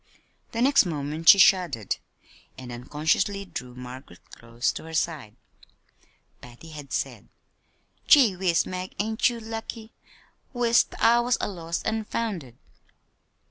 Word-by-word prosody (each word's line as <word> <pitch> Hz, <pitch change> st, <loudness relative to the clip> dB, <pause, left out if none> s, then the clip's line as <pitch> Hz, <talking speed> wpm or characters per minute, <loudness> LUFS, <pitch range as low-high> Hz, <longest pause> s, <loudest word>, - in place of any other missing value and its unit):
The 230 Hz, +1 st, -1 dB
next 270 Hz, -7 st, +4 dB
moment 155 Hz, +1 st, 0 dB
she 200 Hz, -, +10 dB
shuddered 175 Hz, -, +3 dB, 0.6 s
and 125 Hz, -2 st, -9 dB
unconsciously 155 Hz, +11 st, -1 dB
drew 125 Hz, -9 st, -8 dB
Margaret 125 Hz, -6 st, -11 dB
close 115 Hz, +1 st, -3 dB
to -, -, -8 dB
her 160 Hz, 0 st, -7 dB
side. 150 Hz, -9 st, -2 dB, 1.1 s
Patty 125 Hz, +7 st, -13 dB
had 150 Hz, -3 st, -10 dB
said: -, -, -4 dB, 0.8 s
"Gee 250 Hz, -, +6 dB
whiz, 180 Hz, -2 st, +1 dB
Mag, 185 Hz, 0 st, -6 dB
ain't 220 Hz, +3 st, +1 dB
you 235 Hz, -1 st, -6 dB
lucky? 225 Hz, 0 st, -7 dB, 0.6 s
Wis't 240 Hz, -1 st, +2 dB
I 235 Hz, +1 st, +5 dB
was 240 Hz, +1 st, +1 dB
a -, -, -1 dB
lost 170 Hz, -3 st, -5 dB
an' 220 Hz, 0 st, -1 dB
founded!" 180 Hz, -, -4 dB
175 Hz, 130 wpm, -25 LUFS, 140-220 Hz, 1.1 s, she